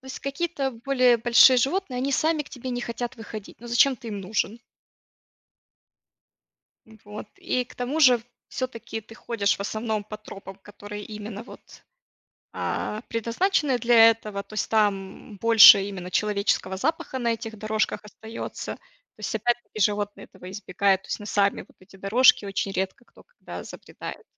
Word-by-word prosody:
то 265 - -17
есть 265 - -7
какие-то 280 0 -2
более 250 0 +3
большие 240 +3 +6
животные, 270 +2 0
они 275 +2 -1
сами 310 +2 +1
к 290 - -18
тебе 255 0 -7
не 245 - -3
хотят 240 +1 -5
выходить. 215 -2 -10
Ну 240 - -10
зачем 250 +3 +3
ты 235 -2 -10
им 205 -2 -5
нужен? 215 +3 -2 2.3
М, 220 -1 -17
вот, 210 +1 -8
и 250 0 -1
к - - -17
тому 255 +6 -3
же, 250 -5 +6 0.3
всё-таки 235 -3 -5
ты 220 +1 -15
ходишь, 215 -3 -1
в - - -11
основном, 215 +1 -3
по 215 +1 -8
тропам, 195 -2 -11
которые 205 +1 -10
именно 210 0 -7
вот, 235 - -13 0.9
а, 215 - -3
предназначены 255 - 0
для 230 -1 +7
этого, 215 -3 -3
то - - -16
есть 215 - -2
там 205 -1 -1
больше 225 -2 +9
именно 185 -2 -7
человеческого 200 -2 0
запаха 285 - -2
на 235 -2 +1
этих 225 -1 -7
дорожках 215 +1 -1
остается. 220 +2 -7
То - - -30
есть 215 - -3
опять-таки 240 0 -2
животные 205 0 0
этого 180 - -13
избегают, 195 0 0
то - - -16
есть - - -3
на 205 - -9
сами 200 -1 +1
вот - - -19
эти 190 +1 -18
дорожки 205 +2 +4
очень 195 0 -2
редко 190 +5 -3
кто - - -20
когда - - -10
забредает. - - -9
225 Hz, 165 wpm, -25 LUFS, 205-250 Hz, 2.3 s, больше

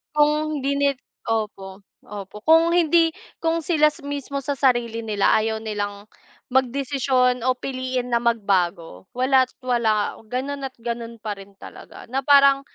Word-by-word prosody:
Kung 300 0 +2
hindi 280 +1 0
ni 280 0 +3 0.4
opo, 205 -3 -3 0.2
opo 205 0 -8
kung 325 +1 +6
hindi 340 -1 +4 0.3
kung 330 -1 0
sila 305 -3 +4 0.2
mismo 285 -1 -4
sa 285 - 0
sarili 240 -4 +1
nila 210 -3 +1
ayaw 220 0 -1
nilang 205 -2 -4 0.5
magdesisyon 260 -1 +1
o 255 +1 +1
piliin 255 -1 -3
na 235 - +4
magbago 190 -7 -1
wala't 260 0 +3 0.2
wala 225 -4 +1 0.2
ganun 275 +3 -3
at - - -35
ganun 235 -1 -4
pa 215 -1 -4
rin 195 0 -14
talaga, - - -12
na 270 - +2
parang 280 -1 +5
250 Hz, 140 wpm, -23 LUFS, 220-280 Hz, 0.5 s, kung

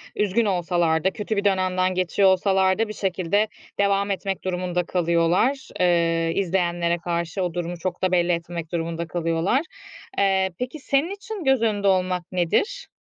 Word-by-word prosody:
üzgün 210 +2 +1
olsalar 175 -4 +1
da, 190 - +2
kötü 210 +1 -3
bir 200 - -1
dönemden 185 -1 +1
geçiyor 185 +2 +3
olsalar 190 +1 +2
da 225 - +2
bir 215 - -6
şekilde 195 +2 0 0.3
devam 200 0 +2
etmek 195 0 -3
durumunda 180 -1 -1
kalıyorlar. 175 +10 +1
Eee, 165 -2 +2
izleyenlere 175 -2 0
karşı 170 +1 -2
o 175 -2 -2
durumu 175 0 -3
çok 180 +2 -4
da 185 - +2
belli 175 -1 +2
etmemek 170 -1 -4
durumunda 170 0 -3
kalıyorlar. 165 - 0 0.6
Eee, 190 -1 +2
peki, 250 +5 -4
senin 280 +6 0
için 405 -2 -7
göz 270 -3 +3
önünde 205 -3 +1
olmak 185 -2 +1
nedir? 185 - 0
185 Hz, 155 wpm, -23 LUFS, 170-200 Hz, 0.6 s, geçiyor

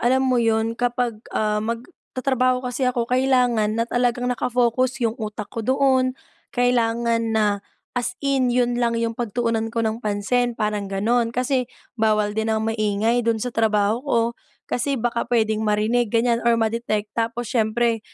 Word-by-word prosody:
alam 260 +2 +2
mo 250 -2 +2
'yon, 225 0 +1
kapag, 240 -2 -1 0.2
ah, 210 0 +1
magtatrabaho 255 +1 -2
kasi 250 +1 0
ako, 245 -2 0
kailangan 250 -4 +2
na 230 - +1
talagang 245 +1 0
naka-focus 250 +1 +1
yung 225 - +2
utak 215 0 -4
ko 230 - -3
doon. 260 +1 +2 0.4
Kailangan 230 -2 +1
na 205 -2 +2 0.3
as 245 0 -2
in 270 -2 +2
yun 245 0 +1
lang 235 -1 +1
yung 230 0 0
pagtuunan 230 0 -1
ko 230 0 -1
ng 220 +1 -2
pansin, 230 +3 0
parang 210 -2 -1
gano'n. 230 +5 +1
Kasi 250 +1 -1 0.2
bawal 215 -2 +1
din 220 +1 -1
ang 220 0 0
maingay 220 +1 +1
dun 230 -1 +1
sa 245 +2 -4
trabaho 215 0 +2
ko, 260 -4 +1 0.4
kasi 275 +3 -1
baka 235 0 -1
pwedeng 220 -2 +1
marinig 220 +2 +1
ganyan 235 +1 +2
or 235 0 +3
ma-detect. 220 -2 -1
Tapos 230 +1 -2
siyempre 230 0 +1
230 Hz, 155 wpm, -22 LUFS, 220-245 Hz, 0.4 s, or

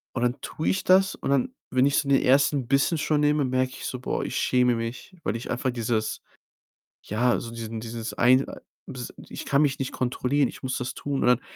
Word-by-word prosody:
Und 120 - -1
dann 125 +2 0
tue 155 - -3
ich 190 - 0
das 190 +1 +4
und - - -3
dann, 135 -3 +1 0.2
wenn 130 +1 +4
ich 140 - +2
so 140 - +1
den 140 -1 +4
1. 135 -1 +3
Bissen 140 +4 +2
schon 150 -1 +1
nehme, 150 0 +3
merke 130 0 0
ich - - -8
so: 125 - -4
„Boah, - - -2
ich - - -4
schäme 125 -1 +3
mich, 115 +11 -6
weil - - -1
ich 115 - -6
einfach 125 +1 -1
dieses 115 -2 -2 0.8
ja, 120 +4 +1
so 115 - -7
diesen 115 -1 -6
dieses 115 0 -5
ein 130 +2 +4
äh, - - -9 0.3
dies 125 -2 -7 0.2
ich - - -7
kann 140 +1 +3
mich 140 -2 +1
nicht 135 - -2
kontrollieren, 130 +2 0
ich - - -11
muss 130 - -2
das 125 0 -4
tun.“, 140 -1 -3
und - - +2
dann 125 0 +4
130 Hz, 230 wpm, -26 LUFS, 120-140 Hz, 0.8 s, das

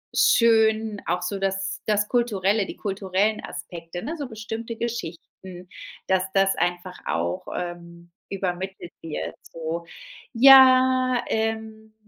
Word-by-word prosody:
schön, 220 -2 +3
auch 180 - -1
so 200 +1 -3
das 195 0 -2
das 210 -1 +1
kulturelle, 210 -4 +1
die - - -9
kulturellen 200 +1 -1
Aspekte, 170 0 -8
ne, 310 +7 -4
so 285 -4 -5
bestimmte 225 +1 -6
Geschichten, 185 -4 -7 0.4
dass 190 -1 +2
das 195 0 +3
einfach 175 +1 -2
auch, 85 +1 -2
ähm, 170 -1 -7 0.2
übermittelt 190 -1 -4
wird, 85 - -5
so. 165 +1 -6 0.5
Ja, 255 0 +6
ähm, 220 0 -3
195 Hz, 115 wpm, -24 LUFS, 175-225 Hz, 0.5 s, Ja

